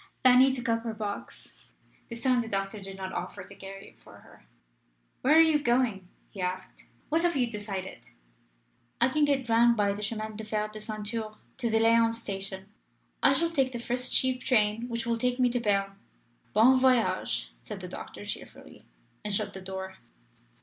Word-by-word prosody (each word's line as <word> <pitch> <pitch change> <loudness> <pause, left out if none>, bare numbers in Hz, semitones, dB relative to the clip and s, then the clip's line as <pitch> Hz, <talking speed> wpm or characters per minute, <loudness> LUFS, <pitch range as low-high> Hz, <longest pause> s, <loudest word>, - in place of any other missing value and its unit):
Fanny 255 +1 +7
took 260 -1 -3
up 230 0 +1
her 225 -1 -5
box 210 -2 -7 0.4
this 235 0 -7
time 255 -2 +3
the 230 - -6
doctor 195 0 -2
did 195 0 -7
not 190 -1 -6
offer 180 - -5
to - - -12
carry 195 0 -10
it - - -26
for - - -16
her. - - -19 0.7
"Where 300 +5 +5
are - - +9
you 320 -2 +4
going?" 240 -8 +1 0.2
he 195 - -7
asked. 185 +1 -5 0.2
"What 320 +2 +2
have 345 -2 +2
you 250 - +3
decided?" 205 -4 -5 1.0
"I 240 +2 +4
can 300 +3 +2
get 275 -3 0
round 235 +1 +4
by 200 -1 +2
the 205 - -7
Chemin 215 +1 -3
de 220 - -5
Fer 215 0 -2
de 215 0 -9
Ceinture 215 0 -4 0.2
to 240 -3 -1
the 225 - +2
Lyons 230 0 +4
station. 195 -2 -5 0.5
I 270 - +6
shall 335 +4 +1
take 270 -5 +1
the - - -3
first 245 +1 0
cheap 255 -1 +3
train 225 -1 +2
which 230 0 -3
will 230 0 -1
take 250 +1 0
me 250 -1 +3
to 245 - 0
Berne." 195 -3 0 0.5
"Bon 235 +5 +6
voyage!" 255 - +1
said - - -7
the - - -7
doctor, - - -8
cheerfully, - - -8 0.4
and 210 - -3
shut 205 -1 -1
the 190 - -8
door. 190 0 -6
225 Hz, 190 wpm, -28 LUFS, 200-250 Hz, 1.0 s, are